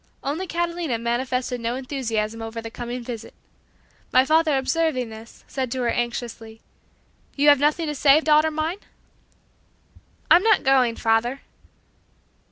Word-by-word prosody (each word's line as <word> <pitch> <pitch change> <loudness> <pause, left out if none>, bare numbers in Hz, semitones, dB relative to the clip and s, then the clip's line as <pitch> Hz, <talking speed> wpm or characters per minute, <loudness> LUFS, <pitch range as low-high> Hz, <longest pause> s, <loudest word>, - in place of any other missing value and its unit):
Only 315 +7 -3
Catalina 340 -7 -2
manifested 250 +1 -2
no 230 +1 -2
enthusiasm 230 -5 -3
over 225 0 -6
the 225 0 -7
coming 240 +1 -6
visit. 230 -2 -8 0.8
My 255 +1 +5
father 315 -1 +3
observing 265 -3 0
this 220 +1 -13
said 260 -2 -3
to 260 - -3
her 235 - +1
anxiously, 235 -2 -4 0.8
"You 290 +1 +4
have 285 -2 +6
nothing 300 +3 +1
to 300 - -3
say, 285 +1 +5
daughter 310 0 +3
mine?" 315 +5 -3 1.5
"I'm 350 - +8
not 435 -1 +3
going, 260 -4 +3
father." 230 +4 0
260 Hz, 135 wpm, -23 LUFS, 235-305 Hz, 1.5 s, I'm